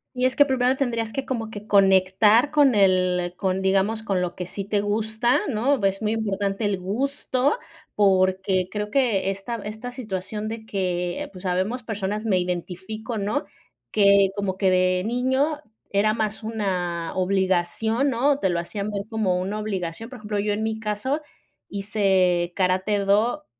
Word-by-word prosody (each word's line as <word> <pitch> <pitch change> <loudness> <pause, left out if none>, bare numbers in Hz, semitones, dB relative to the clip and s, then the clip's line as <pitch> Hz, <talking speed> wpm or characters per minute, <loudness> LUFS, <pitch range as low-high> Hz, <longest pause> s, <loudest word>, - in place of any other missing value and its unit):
Y 250 - +1
es 255 - +1
que 285 - +6
primero 260 -1 +2
tendrías 230 -4 -1
que 270 - -3
como 225 -4 -3
que 210 0 -9
conectar 200 +5 +4
con 290 -4 +5
el 185 -2 +2
con, 190 0 -1
digamos, 195 +3 +1
con 195 -5 0
lo 175 -1 -3
que 180 - -5
sí 200 +1 -5
te 205 0 0
gusta, 220 +3 +1
¿no? 250 0 +1
Es 195 +2 0
muy 215 +1 0
importante 200 -1 -1
el 195 -2 0
gusto 260 +6 0 0.4
porque 190 -1 +2
creo 210 0 -3
que 225 -7 +1
esta 195 +5 -4
esta 220 +4 -7
situación 210 -3 -5
de 220 0 -6
que, 180 -4 -2
pues, 185 +1 -11
habemos 190 +7 -1
personas 210 0 -3
me 190 -4 +2
identifico, 190 +6 -4
¿no? 210 +9 -1 0.5
Que 200 -2 +5
como 195 -2 -2
que 190 -2 +2
de 185 0 +2
niño 260 +5 +1 0.3
era 210 +2 +2
más 220 0 -2
una 180 -6 -2
obligación, 190 +7 +1
¿no? 275 +4 +2
Te 190 - +1
lo 170 -1 0
hacían 200 +4 -4
ver 200 -1 -3
como 195 -5 0
una 200 +3 -3
obligación, 200 +1 -4
por 255 - -9
ejemplo, 210 -1 -3
yo 205 +1 0
en 215 +2 -2
mi 220 0 -2
caso 225 +8 -2 0.5
hice 190 -4 +1
karate-do 200 +4 +1
205 Hz, 165 wpm, -24 LUFS, 190-225 Hz, 0.5 s, que